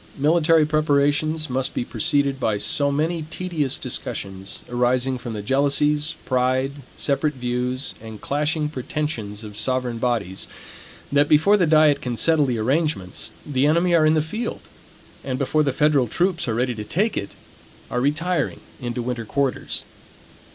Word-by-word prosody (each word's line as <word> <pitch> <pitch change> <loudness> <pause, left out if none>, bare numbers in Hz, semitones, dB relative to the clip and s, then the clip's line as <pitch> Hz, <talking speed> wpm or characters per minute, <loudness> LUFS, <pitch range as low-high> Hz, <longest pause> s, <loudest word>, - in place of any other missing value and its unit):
Military 160 +2 +4
preparations 155 +1 +1
must 130 0 -2
be 120 - -1
preceded 140 -4 +1
by 110 -5 +1
so 140 +7 0
many 160 +4 0
tedious 165 -7 -1
discussions, 95 0 -5
arising 125 +1 +1
from 120 -1 -6
the 105 -1 -5
jealousies, 145 +4 +1
pride, 130 +1 +1 0.2
separate 150 +1 0
views, 125 +1 -2
and 110 -1 -9
clashing 150 +2 0
pretensions 130 -7 -4
of 105 -1 -9
sovereign 125 +1 -1
bodies, 115 -6 -2 0.6
that 145 +1 +4
before 160 +7 +5
the 180 -5 +3
diet 155 -2 +5
can 120 -2 -3
settle 155 +3 +3
the 125 -2 0
arrangements, 130 - -1
the 140 -1 +1
enemy 170 +3 +3
are 160 -2 +5
in 155 - +4
the 155 - +2
field; 215 +10 -4 0.6
and 130 -1 -2
before 145 +3 +1
the 145 -2 +2
federal 145 -2 +3
troops 175 - 0
are 115 - 0
ready 125 +1 0
to 110 -2 -6
take 195 - 0
it, 100 - -4 0.6
are 125 - 0
retiring 160 +6 0 0.2
into 120 -2 -3
winter 120 -1 -3
quarters. 135 +3 -2
140 Hz, 150 wpm, -23 LUFS, 125-155 Hz, 0.6 s, before